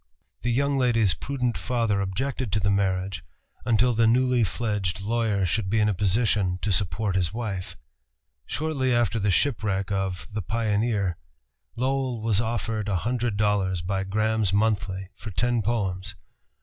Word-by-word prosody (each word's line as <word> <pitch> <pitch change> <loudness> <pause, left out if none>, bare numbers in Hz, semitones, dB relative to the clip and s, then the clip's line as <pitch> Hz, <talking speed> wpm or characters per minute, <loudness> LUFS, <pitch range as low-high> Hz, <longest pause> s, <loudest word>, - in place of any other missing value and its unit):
The 120 - 0
young 140 +3 +1
lady's 115 -7 +3
prudent 125 - -2
father 115 -5 0
objected 125 +4 -2
to 105 - +2
the 100 0 +1
marriage 95 -1 0 0.4
until 120 +2 +3
the 115 0 +3
newly 125 +1 +3
fledged 105 -3 -1
lawyer 105 -2 0
should 95 +3 -1
be 110 +2 +2
in 105 - +3
a 105 - +2
position 100 -1 +1
to 105 - +1
support 95 +1 0
a 90 -3 +2
wife. 105 -5 -4 0.7
Shortly 145 -4 -1
after 115 -2 +1
the 105 0 +1
shipwreck 100 -4 +1
of 95 -2 -2
The 105 - -2
Pioneer, 105 -2 0 0.6
Lowell 130 0 -1
was 110 -1 +1
offered 110 -2 -2
a 100 - +1
hundred 120 -3 0
dollars 100 -4 +1
by 95 +1 -1
Graham's 110 0 +1
Monthly 100 -3 0
for 110 - -9
ten 120 +4 +1
poems. 100 -3 -2
105 Hz, 150 wpm, -26 LUFS, 95-120 Hz, 0.7 s, lady's